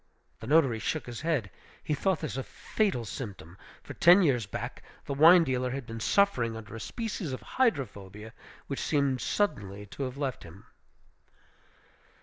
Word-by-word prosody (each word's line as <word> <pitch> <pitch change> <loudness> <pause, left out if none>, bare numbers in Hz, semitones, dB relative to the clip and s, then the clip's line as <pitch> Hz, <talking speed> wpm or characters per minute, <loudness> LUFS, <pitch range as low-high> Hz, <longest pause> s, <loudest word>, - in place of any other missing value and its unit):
The 110 - -9
notary 135 -6 +4
shook 145 +5 -2
his 120 -2 -7
head; 150 - -1 0.3
he 155 - -1
thought 180 +3 0
this - - -4
a 135 - -2
fatal 180 - -2
symptom; 100 -7 -7 0.3
for - - -8
ten 180 +3 +6
years 125 - +2
back - - -6 0.2
the 140 - -3
wine 165 +5 +7
dealer 130 -3 -1
had 130 0 -4
been 115 0 -7
suffering 120 - +2
under 110 0 -9
a - - -6
species 215 - -4
of 130 - -5
hydrophobia, 110 - -2 0.3
which 140 - -4
seemed 140 -4 +1
suddenly 105 - -1
to 100 - -10
have 130 +1 -6
left 140 -3 -3
him. - - -13
130 Hz, 160 wpm, -29 LUFS, 110-160 Hz, 0.3 s, wine